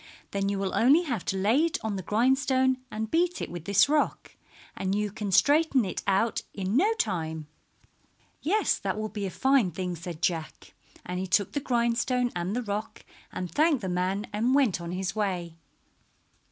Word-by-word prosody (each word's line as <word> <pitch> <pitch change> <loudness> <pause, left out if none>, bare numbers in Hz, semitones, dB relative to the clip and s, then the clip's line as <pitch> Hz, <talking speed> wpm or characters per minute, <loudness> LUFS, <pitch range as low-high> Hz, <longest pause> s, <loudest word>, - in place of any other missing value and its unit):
Then 200 0 -1
you 200 - -1
will 195 -1 -2
only 285 +9 +5
have 240 - -3
to 195 - -1
lay 220 +10 +3
it 335 - 0
on 220 -2 -2
the 190 - -3
grindstone 260 - +2
and 220 0 -4
beat 350 +1 +1
it - - -5
with 170 -2 -7
this 200 +3 +4
rock, 300 +1 0 0.4
and 190 +1 -1
you 210 0 -1
can 205 0 -4
straighten 280 - +4
it 185 - -4
out 200 +4 +1
in 195 +1 -2
no 390 - +4
time." 160 - -2 1.0
"Yes, 415 +8 +1
that - - -2
will 215 0 -3
be 205 -2 -4
a - - -4
fine 265 0 +2
thing," 180 +1 -4
said 170 -1 -7
Jack, 165 -3 -2 0.3
and 180 0 -4
he 190 - -3
took 185 +2 +2
the 285 - -1
grindstone 240 0 0
and 175 +4 -2
the 250 - -1
rock 210 +1 -5 0.3
and 180 -3 -5
thanked 300 - +2
the 190 - -3
man 185 +3 -1
and 235 +5 +2
went 250 -11 +2
on 170 0 -5
his 185 +1 -3
way. 180 -6 -2
210 Hz, 190 wpm, -27 LUFS, 185-260 Hz, 1.0 s, only